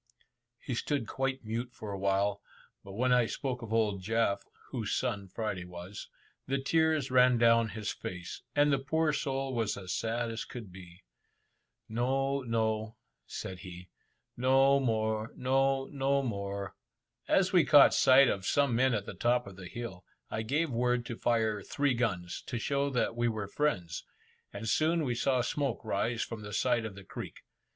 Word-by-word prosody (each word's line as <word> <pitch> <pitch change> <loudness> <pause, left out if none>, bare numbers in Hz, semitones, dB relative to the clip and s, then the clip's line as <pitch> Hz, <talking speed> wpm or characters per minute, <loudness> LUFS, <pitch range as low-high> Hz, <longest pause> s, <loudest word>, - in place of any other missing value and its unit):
He 130 - -5
stood 135 +1 -1
quite 135 +2 -2
mute 115 +3 -3
for 105 -2 -7
a 100 - -4
while, 100 +1 +1 0.4
but 100 - -10
when 125 +4 +2
I 125 -2 +4
spoke 125 +3 -3
of 115 -2 -7
old 105 -4 +1
Jaf 110 0 +1 0.3
(whose - - -2
son 100 -1 -2
Friday 100 -1 -3
was), 90 +3 -9 0.4
the 135 +1 +1
tears 155 -1 +1
ran 125 -1 +5
down 115 -1 +4
his 110 -2 -4
face, 90 -1 -7
and 145 0 +4
the 135 - +2
poor 155 +3 +1
soul 135 -2 -2
was 115 -4 -1
as 95 -2 -5
sad 115 +1 -1
as 115 - -4
could 115 -6 -9
be. 90 -1 -13 0.8
"No, 135 +4 0
no," 110 -2 -1 0.3
said 95 -1 -6
he, 90 -2 -10 0.5
"no 135 +2 +4
more, 110 -3 -1
no, 135 +1 +2
no 140 0 0
more." 100 -4 -4 0.5
As 190 0 +3
we 175 -3 +6
caught 145 -2 +7
sight 135 0 +6
of 95 -4 -1
some 140 -4 +2
men 130 0 +3
at 100 -2 -2
the - - -6
top 120 +1 +1
of 100 -2 -10
the 95 -1 -9
hill, 95 -4 -7 0.3
I 110 - -1
gave 145 +7 0
word 125 0 +1
to 120 - -5
fire 110 -3 +1
three 140 +5 0
guns, 95 -8 -2
to 120 - -3
show 140 +4 0
that 125 -3 0
we 120 0 +1
were 110 -3 -2
friends, 100 - -1 0.5
and 115 - -6
soon 160 +7 +2
we 125 -4 0
saw 130 +1 +1
smoke 135 -2 -2
rise 110 +2 0
from 115 -2 -6
the 105 0 -8
side 120 -1 +1
of 105 -3 -6
the 100 - -10
creek. - - -8
115 Hz, 175 wpm, -31 LUFS, 105-135 Hz, 0.8 s, caught